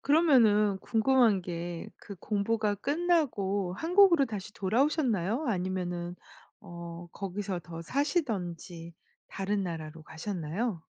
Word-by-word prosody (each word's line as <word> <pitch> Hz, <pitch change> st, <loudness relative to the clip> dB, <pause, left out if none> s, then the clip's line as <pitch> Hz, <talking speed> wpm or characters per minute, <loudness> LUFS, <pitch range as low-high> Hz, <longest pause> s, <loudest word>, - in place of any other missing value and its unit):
그러면은 230 Hz, -, +4 dB
궁금한 225 Hz, -3 st, +3 dB
게 170 Hz, -1 st, -5 dB
그 200 Hz, -, -10 dB
공부가 210 Hz, +2 st, 0 dB
끝나고 245 Hz, -, 0 dB
한국으로 340 Hz, -, +5 dB
다시 205 Hz, -3 st, -6 dB
돌아오셨나요? 235 Hz, -, +1 dB
아니면은 180 Hz, -3 st, -2 dB, 0.5 s
어 170 Hz, 0 st, -8 dB
거기서 195 Hz, -1 st, -4 dB
더 165 Hz, -1 st, -8 dB
사시든지 185 Hz, -, -2 dB, 0.4 s
다른 195 Hz, +1 st, -1 dB
나라로 160 Hz, -2 st, -6 dB
가셨나요? 175 Hz, +3 st, -4 dB
200 Hz, 270 characters per minute, -30 LUFS, 175-245 Hz, 0.5 s, 한국으로